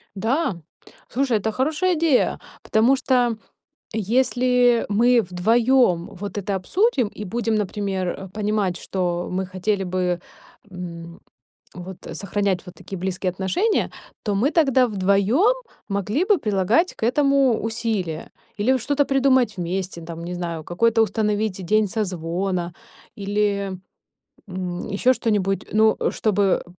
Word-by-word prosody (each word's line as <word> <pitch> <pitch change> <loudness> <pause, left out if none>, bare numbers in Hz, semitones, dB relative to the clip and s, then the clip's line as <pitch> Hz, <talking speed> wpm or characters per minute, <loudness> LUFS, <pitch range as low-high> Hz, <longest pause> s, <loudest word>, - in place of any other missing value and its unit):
Да, 225 - 0 0.5
слушай, 255 -3 +1
это 220 +2 -2
хорошая 310 - +1
идея! 320 -5 +2 0.2
Потому 235 +5 +3
что 245 -3 +1 0.6
если 245 +2 +2
мы 235 +4 +4
вдвоём 215 0 +2
вот 200 +2 -6
это 200 0 -2
обсудим 265 - +1
и 210 - -8
будем, 225 +3 -1
например, 200 -2 -1
э, 190 +2 -5
понимать, 205 -2 -1
что 175 -2 -2
мы 185 +1 -2
хотели 190 +2 -1
бы, 180 -1 -1 0.5
м, 170 -2 -8 0.5
вот 180 0 -8
сохранять 200 -1 -1
вот 180 - -10
такие 195 - -8
близкие 185 0 -2
отношения. 190 - 0 0.3
То 205 - -1
мы 260 +10 +2
тогда 270 -6 +4
вдвоём 205 - +3 0.3
могли 205 - 0
бы 400 -1 +3
прилагать 215 - +1
к - - -18
этому 270 0 +3
усилия 220 -8 -3 0.3
или 210 +5 +1
вот 260 - +1
что-то 285 +4 +1
придумать 260 -6 +2
вместе 180 0 -3
там, 165 0 -7
не 175 +1 -5
знаю, 170 -2 -4
какой-то 225 +7 +2
установить 210 -3 -1
день 215 +2 +3
созвона 180 -3 -2 0.4
или, 200 -1 -1 0.8
м, 180 -1 -4
ещё 230 +6 +3
что-нибудь. 200 -5 0
Ну, 220 0 +4
чтобы, 205 -3 +1
205 Hz, 130 wpm, -22 LUFS, 185-245 Hz, 0.8 s, мы